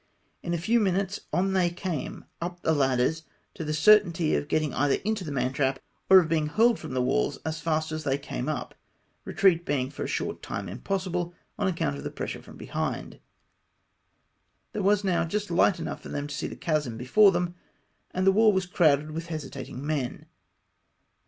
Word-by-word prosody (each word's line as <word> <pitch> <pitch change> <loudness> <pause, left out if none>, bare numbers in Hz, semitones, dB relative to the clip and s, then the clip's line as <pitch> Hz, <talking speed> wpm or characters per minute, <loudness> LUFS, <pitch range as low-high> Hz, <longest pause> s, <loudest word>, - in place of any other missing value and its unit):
In 170 - -4
a - - 0
few 220 +9 +2
minutes 195 -1 0
on 190 +1 +1
they 180 -2 +3
came 175 -3 -5 0.2
up 175 +1 -5
the 160 - +3
ladders, 135 +2 +2 0.3
to - - -6
the 155 - -3
certainty 170 -1 +4
of 145 - 0
getting 155 -1 0
either 140 0 +2
into 215 -2 0
the 155 - -5
mantrap, 135 0 0 0.3
or 190 - +10
of 180 -4 +5
being 155 -2 +1
hurled 225 +8 +3
from 130 - -6
the 125 - +2
walls 135 +2 +1
as 160 0 -3
flist 155 -1 0
as 155 0 -4
they 135 -2 +1
came 100 - -4
up, - - -4 0.5
retreat 180 -4 +3
being 135 -4 -1
for 145 - -5
a - - -3
short - - -3
time 100 -1 -5
impossible, 180 - -3 0.2
on 205 - +1
account 165 - -1
of 70 - -8
the - - -3
pressure - - -5
from - - -14
behind. - - -4 1.5
There 210 - -2
was 205 +1 +3
now 185 -4 +2
j 165 +5 -1
ust 205 -3 -5
light 175 +1 +3
enough - - -5
for - - -10
them 145 0 -3
to 145 - -6
see 140 - -3
the - - -7
chasm 150 -8 -1
before 195 - +5
them, 175 -1 -1 0.6
and 185 0 -1
the 195 - +7
wall 215 +2 +5
was 190 -2 0
crowded 155 -4 +2
with 165 +2 -5
hesitating 140 -4 -6
men. 145 -5 -2
165 Hz, 195 wpm, -27 LUFS, 145-190 Hz, 1.5 s, or